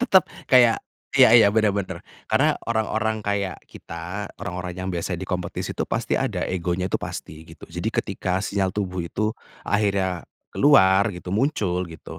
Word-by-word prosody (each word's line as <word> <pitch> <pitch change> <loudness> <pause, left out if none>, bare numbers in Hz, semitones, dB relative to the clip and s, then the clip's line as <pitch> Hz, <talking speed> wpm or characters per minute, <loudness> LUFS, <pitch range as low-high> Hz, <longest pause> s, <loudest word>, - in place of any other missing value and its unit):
Tetep 195 -7 +5 0.2
kayak 120 -4 +6 0.4
iya - - +8
iya, 115 -4 +8
bener 110 -1 +2
bener. 95 -3 -4 0.2
Karena - - +2
orang-orang 110 -1 0
kayak 100 -4 -1
kita, 90 +5 -7
orang-orang 90 -1 -5
yang 95 0 -4
biasa 85 +1 -2
di 95 - -5
kompetisi, 90 -1 -3
itu - - -2
pasti - - 0
ada - - -1
egonya, 90 +1 -2
tuh - - +1
pasti, 80 +1 -7
gitu. - - -12
Jadi, - - -2
ketika 95 0 -2
sinyal 100 -2 -1
tubuh 95 -3 -3
itu 105 +6 -1 0.3
akhirnya 95 -4 0 0.2
keluar 100 -9 +5
gitu, 90 0 -8
muncul 100 - 0
gitu, 80 - -10
95 Hz, 160 wpm, -23 LUFS, 90-105 Hz, 0.4 s, iya